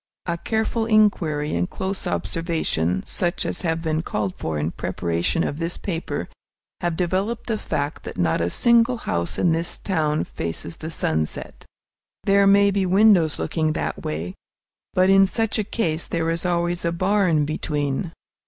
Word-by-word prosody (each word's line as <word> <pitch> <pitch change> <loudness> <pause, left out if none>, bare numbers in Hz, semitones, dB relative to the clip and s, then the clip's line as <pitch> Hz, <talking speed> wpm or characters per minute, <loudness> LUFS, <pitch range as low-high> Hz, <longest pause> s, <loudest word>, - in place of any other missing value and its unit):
A 170 - -1
careful 220 +4 -1
inquiry 175 - +2
and 85 +1 0
close 190 +1 -3
observation, 95 - -1
such 175 0 0
as - - -3
have 165 -2 -1
been 160 -1 0
called 105 - -2
for 80 -1 -3
in 75 +2 -1
preparation 85 - -1
of 145 - -3
this 165 +1 -2
paper, 170 -4 -3 0.5
have 175 -2 -1
developed 190 +6 -1
the 225 - -1
fact 145 -1 -3
that - - -7
not 85 -1 +1
a 85 - +1
single 235 - +4
house 85 - -2
in 175 - +3
this 165 +1 -1
town 155 -5 0
faces 85 0 -5
the 160 - -6
sunset! 80 - -2 0.6
There 200 0 +4
may 200 0 +6
be 195 0 +1
windows 185 -4 +4
looking 155 -2 0
that - - -3
way, 80 +4 -3 0.6
but 185 +1 +5
in 195 0 +6
such 225 +2 0
a - - +1
case 175 -7 -2
there 165 -1 0
is 170 +2 -2
always 175 0 0
a 170 - +1
barn 180 -3 +2
between. 150 +1 -2
165 Hz, 160 wpm, -23 LUFS, 145-195 Hz, 0.6 s, may